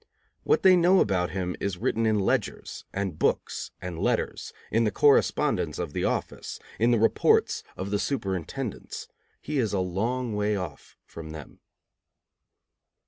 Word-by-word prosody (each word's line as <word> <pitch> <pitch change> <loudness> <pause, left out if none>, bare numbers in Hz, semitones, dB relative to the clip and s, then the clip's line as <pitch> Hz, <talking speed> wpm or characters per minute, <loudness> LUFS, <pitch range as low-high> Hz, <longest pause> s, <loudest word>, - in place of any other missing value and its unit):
What 450 - +2
they 185 -1 +8
know 180 +2 +5
about 90 -3 +2
him 90 -1 -3
is 100 -3 -2
written 115 +5 0
in 110 -1 +3
ledgers 95 - -1
and 95 -5 -3
books - - 0
and 90 -3 -6
letters, - - -1 0.2
in 115 +1 +3
the 110 - +3
correspondence 140 +7 +3
of - - -4
the - - -1
office, - - -3 0.2
in 115 +2 +4
the 120 - +4
reports 110 +1 +3 0.2
of 95 +2 -4
the 105 - +1
superintendents. 100 - -3 0.4
He 150 -1 -1
is 110 -5 0
a 100 - +1
long 110 +6 -1
way 105 0 +1
off 90 -7 -7
from 80 -1 -9
them. 75 -3 -10
105 Hz, 150 wpm, -27 LUFS, 90-120 Hz, 0.4 s, they